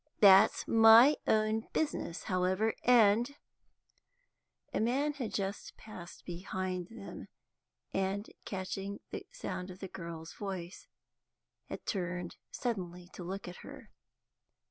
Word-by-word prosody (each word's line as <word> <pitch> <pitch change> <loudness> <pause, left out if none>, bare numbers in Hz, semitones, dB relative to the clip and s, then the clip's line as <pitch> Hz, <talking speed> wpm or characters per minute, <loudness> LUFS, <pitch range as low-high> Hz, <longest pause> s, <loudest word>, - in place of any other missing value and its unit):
That's 200 +1 +7
my 225 +5 +8
own 215 +1 +2
business, 290 - -2
however, 185 +4 +1
and 240 +2 +5 0.7
" - - -45
A - - 0
man 270 +7 +1
had 260 -6 -4
just 195 0 -4
passed 180 -5 -11
behind 185 0 -4
them, 225 -3 -9 0.7
and, 195 +2 -1 0.2
catching 195 +1 -4
the - - -6
sound 340 - -5
of 180 - -9
the 190 - -6
girl's 170 -3 -8
voice, 190 -3 -6 0.8
had - - -7
turned 180 -2 -3
suddenly 180 -7 -4
to 180 - -8
look 190 +3 -5
at 180 - -8
her. - - -11
195 Hz, 120 wpm, -32 LUFS, 180-225 Hz, 0.8 s, my